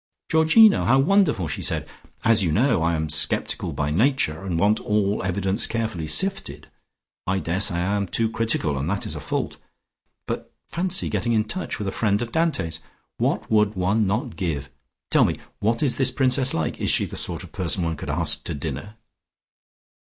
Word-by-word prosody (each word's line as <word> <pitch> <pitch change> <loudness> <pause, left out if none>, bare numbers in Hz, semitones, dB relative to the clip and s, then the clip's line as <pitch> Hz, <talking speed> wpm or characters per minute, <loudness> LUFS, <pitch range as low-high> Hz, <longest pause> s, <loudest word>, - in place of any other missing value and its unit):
"Georgino! 165 +7 +6
How 130 +3 +4
wonderful!" 150 - +3
she 70 - -4
said. - - -1 0.4
"As 110 -2 +4
you 85 - +1
know, 115 - +2
I 85 +1 +1
am 80 0 -2
sceptical 75 0 -1
by 75 0 -2
nature, 95 - +1
and 90 -4 -2
want 105 +3 +3
all 105 -1 0
evidence 95 +1 -1
carefully 110 -9 -3
sifted. 75 - -1 0.6
I 95 +1 +1
daresay 95 +1 0
I 90 +4 0
am 100 -1 -1
too 115 +5 +1
critical, 110 -11 0
and 70 +5 -2
that 100 +1 -2
is - - -4
a - - -5
fault. - - -3 0.7
But - - -5 0.2
fancy 185 +2 0
getting 120 - -1
in 110 -1 +3
touch 180 +12 -4
with 105 - -4
a - - -1
friend 100 0 +1
of 120 - -7
Dante's! 155 - -1 0.4
What - - -1
would 105 -1 +3
one 100 +3 +1
not 115 +5 -2
give? 75 -7 -3 0.4
Tell - - +5
me: - - 0 0.2
what 115 +5 0
is 135 - +1
this 135 -2 +2
Princess 130 0 +1
like? 80 -1 -2
Is - - +1
she - - +3
the - - -8
sort - - -1
of - - -12
person 90 0 -1
one 80 -1 -1
could 75 - -7
ask 75 0 0
to 85 - -3
dinner?" 75 - -6
100 Hz, 190 wpm, -23 LUFS, 85-120 Hz, 0.7 s, Georgino